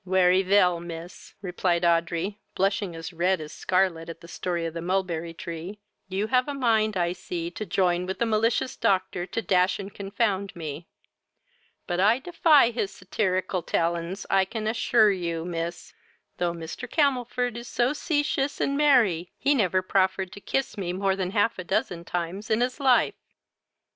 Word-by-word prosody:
"Wery 185 0 +4
vell, 185 -2 +3
miss, 170 0 -9
(replied 175 -1 0
Audrey, 170 +4 +1 0.2
blushing 195 -2 0
as 165 +2 -7
red 180 +2 +1
as 155 -1 -7
scarlet 180 -3 0
at 165 0 -8
the 170 - -13
story 170 0 -3
of 165 - -4
the 165 - -5
mulberry 175 -2 -1
tree,) 170 +4 -7 0.3
you 195 +2 -1
have 255 +3 +2
a 285 - -3
mind 220 -5 +2
I 175 -1 +1
see 175 -1 -5
to 215 +3 -6
join 180 0 +1
with 190 - -3
the 235 - +1
malicious 225 +3 +1
doctor 185 -2 0
to 225 - -2
dash 185 0 +2
and 195 -1 -7
confound 200 -1 -1
me; 160 -1 -6 1.0
but 175 -1 -2
I 210 +5 +5
defy 305 -4 +4
his 215 -4 -2
satarical 185 -1 -1
talons, 170 +3 -1
and 195 -1 +2
can 220 -2 -4
ashure 220 -1 +4
you, 170 -3 -3
miss, 170 0 -5 0.4
though 175 -1 0
Mr. 165 -1 -7
Camelfor 250 -5 +1
is 235 0 -7
so 245 +2 +1
cetious 290 -2 -1
and 280 - 0
merry, 235 - +3
he 285 - +2
never 185 - +2
proffered 190 0 +1
to 200 - -10
kiss 270 -4 -2
me 180 -2 -2
more 195 +1 +1
than 190 -2 -2
half 205 +1 +1
a - - -3
dozen 175 -3 -1
times 180 +5 -4
in 220 +2 +2
his 255 +3 -1
life." 265 -3 +4
190 Hz, 170 wpm, -26 LUFS, 175-220 Hz, 1.0 s, I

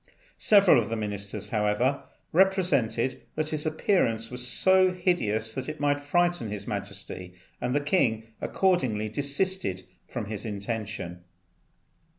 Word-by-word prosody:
Several 195 - +6
of 110 - -5
the 115 - -1
ministers, 105 -1 -4
however, 110 +6 +1 0.3
represented 170 - +2
that 155 0 -2
his 155 0 -1
appearance 120 - +1
was 125 0 -1
so 190 +5 +5
hideous 115 - 0
it 150 +4 -4
might 145 0 +1
frighten 175 -4 +1
His 100 -1 -5
Majesty, 100 -3 -5 0.3
and 125 +2 -1
the 145 - +2
king 115 - +1
accordingly 130 - +1
desisted 140 - -1 0.2
from 120 -4 -4
his 105 0 -5
intention. 100 -4 -5
120 Hz, 125 wpm, -27 LUFS, 105-155 Hz, 0.3 s, Several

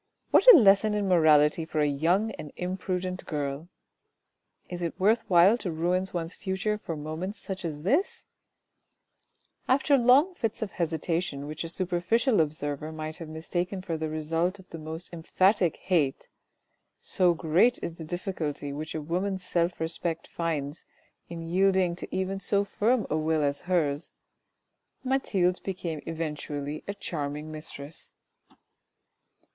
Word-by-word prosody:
What - - +9
a 385 - +10
lesson 210 -2 +5
in 205 -1 0
morality 155 -3 +5
for 160 -1 -3
a 150 - +4
young 170 +10 +1
and 155 -7 -8
imprudent 185 0 -3
girl! 145 +1 -3 1.0
Is 175 -1 -6
it 170 +2 -3
worth 220 +4 +3
while 185 +6 +6
to 185 - -3
ruin 175 +3 0
one's 170 0 -3
future 190 +2 -2
for 165 -6 -5
moments 160 +7 -5
such 190 -2 -6
as 150 -3 -4
this? 285 - +1 1.4
After 275 +2 +4
long 265 +10 +5
fits 225 -9 -2
of 205 - -5
hesitation 165 -3 -2
which 155 +2 -5
a 165 - -5
superficial 185 +6 +2
observer 150 0 -3
might 155 0 -6
have 165 -2 -8
mistaken 175 +4 -3
for 170 -3 -3
the 160 0 -3
result 165 +4 -1
of 190 -2 -17
the 165 - -8
most 160 +3 -6
emphatic 185 +2 +2
hate 155 -8 0 0.7
(so 180 -2 +2
great 175 +10 +3
is 165 - -4
the 165 - -7
difficulty 155 -4 -4
which 155 +3 -5
a 155 - -2
woman's 185 +4 -2
self 175 -1 0
respect 165 0 -2
finds 155 -3 -3 0.5
in 165 -1 -6
yielding 185 0 +2
even 190 +1 -2
to - - -7
so 200 -1 +2
firm 220 +3 +1
a 155 - +2
will 155 0 +1
as 140 0 -1
hers) 155 -4 0 0.9
Mathilde 200 -9 +1
became 175 -5 -4
eventually 150 -2 -4
a 200 - -3
charming 150 -5 -4
mistress. 155 -1 -8
170 Hz, 145 wpm, -28 LUFS, 155-190 Hz, 1.4 s, a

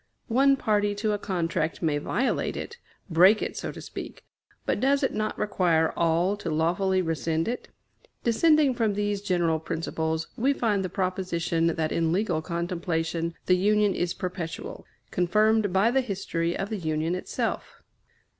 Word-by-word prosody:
One 275 +4 +4
party 205 -3 +1
to 210 +1 0
a 205 - -1
contract 170 -4 -2
may 150 -3 +1
violate 245 - -1
it 475 - -7 0.3
break 185 +5 +5
it, - - -4
so - - -4
to - - -10
speak; - - -8 0.4
but - - 0
does 275 +3 +2
it 265 - +1
not 215 0 -2
require 175 -6 +1
all 170 +4 +2
to 185 - -5
lawfully 180 +4 +1
rescind 165 0 -1
it? 245 +2 -3 0.6
Descending 295 +4 +4
from 225 -4 0
these 205 -1 -1
general 175 -5 +1
principles, 160 0 -3
we 270 +5 +2
find 210 -7 0
the 185 - -3
proposition 180 -3 -1
that 160 -1 0
in 165 -1 +1
legal 185 -3 0
contemplation 170 -1 -2
the 180 - +4
Union 205 +1 +3
is 175 0 -1
perpetual, 180 -3 -5 0.2
confirmed 210 +3 +2
by 195 +5 +3
the 265 +1 +3
history 185 -7 -2
of 195 +1 -3
the 215 - -1
Union 160 0 -1
itself. 185 - -4
185 Hz, 155 wpm, -26 LUFS, 165-210 Hz, 0.6 s, break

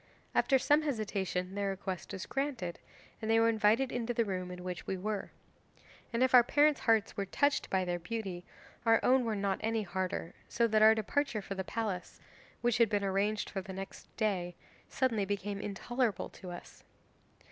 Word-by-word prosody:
After 270 - +4
some 295 +4 +4
hesitation 200 -9 -2
their 200 0 -1
request 190 -1 -4
was 190 - -5
granted, 265 -11 -3 0.4
and 220 - -3
they 225 0 +5
were 230 0 +5
invited 225 +4 +3
into 240 0 -2
the 230 - +2
room 185 -2 -3
in 180 0 -8
which 180 -2 -5
we 190 - -1
were. 205 +1 -3 0.8
And 235 +1 +2
if 260 - +2
our 250 - +10
parents' 290 +3 +3
hearts 225 -2 +2
were 200 -2 -2
touched 285 +8 +1
by 190 -1 +1
their 175 0 -1
beauty, 185 -1 -4 0.4
our 225 -1 +5
own 255 -1 +4
were 225 -2 0
not 200 -1 -1
any 225 0 0
harder, 185 -2 -3 0.2
so 235 - +2
that 220 -1 +3
our 220 +1 +8
departure 220 0 -1
for 195 - -5
the 190 -1 -3
palace, 200 -3 -4 0.4
which 240 -1 +2
had 230 -2 +5
been 205 -2 0
arranged 200 +2 0
for 195 - -3
the 190 0 -8
next 195 +1 -8
day, 185 -6 0 0.3
suddenly 235 -6 +1
became 200 0 -3
intolerable 225 +2 -1
to 185 - -10
us. 175 0 -10
210 Hz, 185 wpm, -32 LUFS, 190-230 Hz, 0.8 s, our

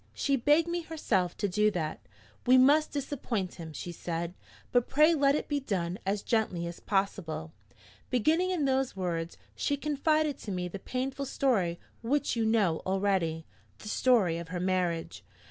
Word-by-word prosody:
She 280 - +1
begged 295 +6 +3
me 345 0 -1
herself 225 - -1
to 205 - 0
do 210 +3 +3
that. 160 -6 -3 0.5
'We 255 +1 +7
must 290 +4 +5
disappoint 255 -9 -3
him,' 160 -1 -7
she 175 +3 -6
said, 170 0 -4 0.4
'but 245 -1 +3
pray 305 +4 +5
let 280 -2 +3
it - - -2
be 290 -1 0
done 185 -7 -2
as 200 +1 0
gently 210 -7 0
as 170 0 -6
possible.' 195 - -2 0.6
Beginning 315 - +2
in 345 -6 0
those 265 -3 +1
words, 170 -3 -3 0.2
she 285 - 0
confided 300 0 +1
to 205 - -6
me 180 -1 -2
the 195 +3 -7
painful 265 +5 -3
story 195 -12 +1 0.2
which 275 +4 0
you 230 -1 +1
know 205 -8 +2
already 190 -4 0 0.3
the 210 - -9
story 210 -10 +3
of 170 - -7
her 180 +1 -4
marriage. 180 -2 -1
210 Hz, 165 wpm, -30 LUFS, 175-275 Hz, 0.6 s, We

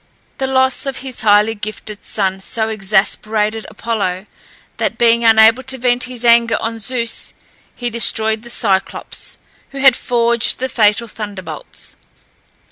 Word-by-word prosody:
The 265 - -1
loss 260 +1 +1
of 270 -2 -3
his 255 -2 -4
highly 210 +1 +4
gifted 215 -1 -8
son 190 -2 -1
so 220 +3 -2
exasperated 215 +1 0
Apollo 200 -5 -3 0.5
that, - - -2
being 235 0 +3
unable 225 +2 +6
to 265 0 -3
vent 245 0 +1
his 250 -1 -6
anger 235 0 +4
on 225 0 -4
Zeus, 235 +1 -4 0.4
he 240 -1 -4
destroyed 220 -1 +1
the 240 - -11
Cyclops, 200 -5 -1 0.3
who 275 - -11
had 270 -2 +5
forged 235 -2 +1
the 260 +1 -3
fatal 220 0 +2
thunderbolts. 205 - -8
225 Hz, 135 wpm, -16 LUFS, 215-245 Hz, 0.5 s, unable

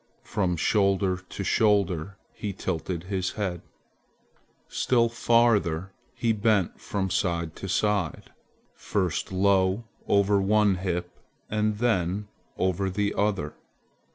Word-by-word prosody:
From 90 -4 -1
shoulder 100 +1 +2
to 90 +2 -7
shoulder 100 -3 +1 0.2
he 105 -2 -4
tilted 90 -2 -3
his 95 -1 -2
head. 95 -5 -3 1.1
Still 115 -2 +2
farther 110 -7 +2 0.2
he 115 -2 +1
bent 105 -3 +1
from 95 -2 -2
side 85 -4 -1
to 95 - -6
side, 100 -3 0 0.4
first 95 -4 -2
low 95 +2 +2 0.2
over 100 0 +3
one 105 -1 +3
hip 90 -1 -3 0.3
and 105 0 +1
then 105 -3 0 0.3
over 95 +1 0
the 100 +2 -1
other. 100 -8 0
95 Hz, 110 wpm, -26 LUFS, 90-105 Hz, 1.1 s, over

